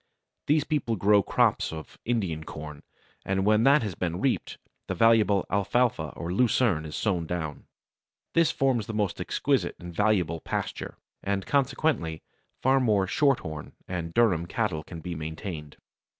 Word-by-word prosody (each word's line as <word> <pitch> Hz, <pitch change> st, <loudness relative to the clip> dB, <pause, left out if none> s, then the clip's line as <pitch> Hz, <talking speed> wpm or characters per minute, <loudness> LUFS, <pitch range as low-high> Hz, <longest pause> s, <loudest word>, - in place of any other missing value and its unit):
These 150 Hz, 0 st, +3 dB
people 140 Hz, -7 st, -1 dB
grow 100 Hz, +1 st, +4 dB
crops -, -, +1 dB
of 80 Hz, -1 st, -9 dB
Indian 95 Hz, -10 st, -1 dB
corn, 75 Hz, -1 st, -8 dB, 0.4 s
and 95 Hz, 0 st, 0 dB
when 105 Hz, +2 st, +4 dB
that 140 Hz, 0 st, +5 dB
has 105 Hz, -4 st, -3 dB
been 85 Hz, 0 st, -3 dB
reaped, 135 Hz, +2 st, -1 dB, 0.3 s
the -, -, -2 dB
valuable 110 Hz, -4 st, +4 dB
Alfalfa 100 Hz, -4 st, +1 dB
or 85 Hz, +1 st, -4 dB
Lucerne 110 Hz, -7 st, +2 dB
is 75 Hz, -, -7 dB
sown 90 Hz, -6 st, 0 dB
down. 80 Hz, -4 st, -4 dB, 0.7 s
This 165 Hz, -2 st, +4 dB
forms 130 Hz, -6 st, +1 dB
the 110 Hz, -, -4 dB
most 105 Hz, -4 st, -1 dB
exquisite -, -, 0 dB
and 85 Hz, 0 st, -9 dB
valuable 90 Hz, -5 st, +1 dB
pasture, -, -, -4 dB, 0.2 s
and 100 Hz, -1 st, -2 dB
consequently 135 Hz, -, 0 dB, 0.4 s
far 135 Hz, +1 st, +4 dB
more 105 Hz, -6 st, +2 dB
Shorthorn 95 Hz, -, 0 dB
and 85 Hz, -2 st, -4 dB
Durham 90 Hz, -6 st, +2 dB
cattle 80 Hz, -2 st, -1 dB
can 85 Hz, 0 st, -9 dB
be 90 Hz, +2 st, -5 dB
maintained. 80 Hz, -1 st, -6 dB
95 Hz, 150 wpm, -27 LUFS, 80-115 Hz, 0.7 s, that